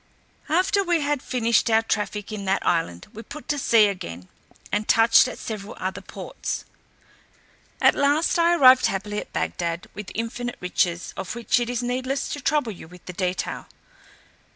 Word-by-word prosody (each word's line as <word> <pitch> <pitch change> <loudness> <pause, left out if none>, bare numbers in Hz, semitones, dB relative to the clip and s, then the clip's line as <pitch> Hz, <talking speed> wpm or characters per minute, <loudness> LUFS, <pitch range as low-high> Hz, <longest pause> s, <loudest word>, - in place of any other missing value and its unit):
After 370 +5 +2
we 345 -3 +1
had 290 -2 0
finished 235 -2 +1
our 225 0 +4
traffic 210 -1 -2
in 205 -2 -5
that 195 +1 0
island, 165 - 0
we 220 - -8
put 285 +7 -10
to 290 - 0
sea 230 -4 +5
again, 90 - -5 0.4
and 210 +1 -1
touched 230 +3 +6
at 250 - -7
several 210 -2 -7
other 185 +1 -3
ports; - - -6 1.1
at - - +5
last 290 +5 +2
I 340 +1 +4
arrived 260 -5 +7
happily 205 +2 -3
at - - -9
Bagdad 165 - -2
with 210 -1 -8
infinite 240 +2 -4
riches, 180 -1 -1
of 190 - -5
which 235 +1 +1
it 240 0 -2
is 245 0 -2
needless 255 +3 -2
to 290 - -4
trouble 295 -7 +1
you 175 -5 -11
with 180 +1 -16
the 180 - -7
detail. 185 0 -3
225 Hz, 170 wpm, -24 LUFS, 185-255 Hz, 1.1 s, arrived